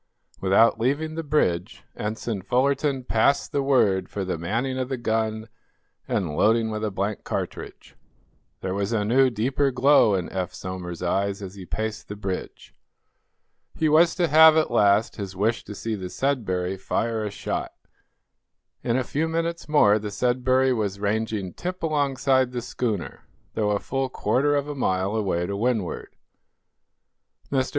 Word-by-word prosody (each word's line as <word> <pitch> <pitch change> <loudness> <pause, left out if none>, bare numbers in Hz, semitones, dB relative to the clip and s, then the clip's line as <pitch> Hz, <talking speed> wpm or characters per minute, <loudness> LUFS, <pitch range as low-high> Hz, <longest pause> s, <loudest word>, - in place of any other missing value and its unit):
Without 100 +4 +4
leaving 145 +7 0
the 165 - -3
bridge 110 - 0
Ensign 110 -1 -3
Fullerton 135 +5 +1
passed 125 +4 +2
the 140 - 0
word 105 -9 +2
for 100 -2 -4
the 90 - -2
manning 115 +11 -2
of 130 0 -2
the 130 - -2
gun 110 -1 -1 0.6
and 85 -6 -1
loading 110 +3 +3
with 110 0 -4
a 110 - 0
blank 100 +1 -3
cartridge. - - -6 0.7
There 95 - -2
was 100 +2 -2
a 105 -2 +1
new, 130 +4 +4
deeper 130 +5 0
glow 130 -4 +4
in 90 -3 -2
Eph 95 -2 -3
Somers's 90 -2 -6
eyes 100 +3 -1
as 95 -1 -7
he 95 -3 -10
paced 110 +3 -4
the 105 - -6
bridge. 95 -2 -6 1.0
He 160 - +1
was 160 +2 +4
to 175 -2 +2
have, 160 0 +7
at 155 - +2
last, 105 +2 +3
his 95 -3 -6
wish 110 +5 0
to 105 - -8
see 115 +2 -4
the 95 -4 -5
"Sudbury" 95 -10 -1
fire 110 +3 -1
a 105 - -2
shot. 100 - -4 1.1
In 120 0 +1
a 130 - +1
few 150 +6 -1
minutes 165 0 -3
more 110 -9 +5
the 105 0 -5
"Sudbury" 130 +3 +2
was 100 -4 -2
ranging 105 -2 -2
tip 180 0 -5
alongside 135 -4 +1
the 120 -1 -3
schooner, 110 -8 -3 0.3
though 105 -2 0
a 105 - +2
full 135 +5 -2
quarter 145 +3 +1
of 145 0 -1
a 145 - -4
mile 95 -6 0
away 95 -5 0
to 100 - -3
windward. 110 -3 -2 1.4
"Mr. 130 -1 +1
110 Hz, 160 wpm, -24 LUFS, 100-135 Hz, 1.4 s, have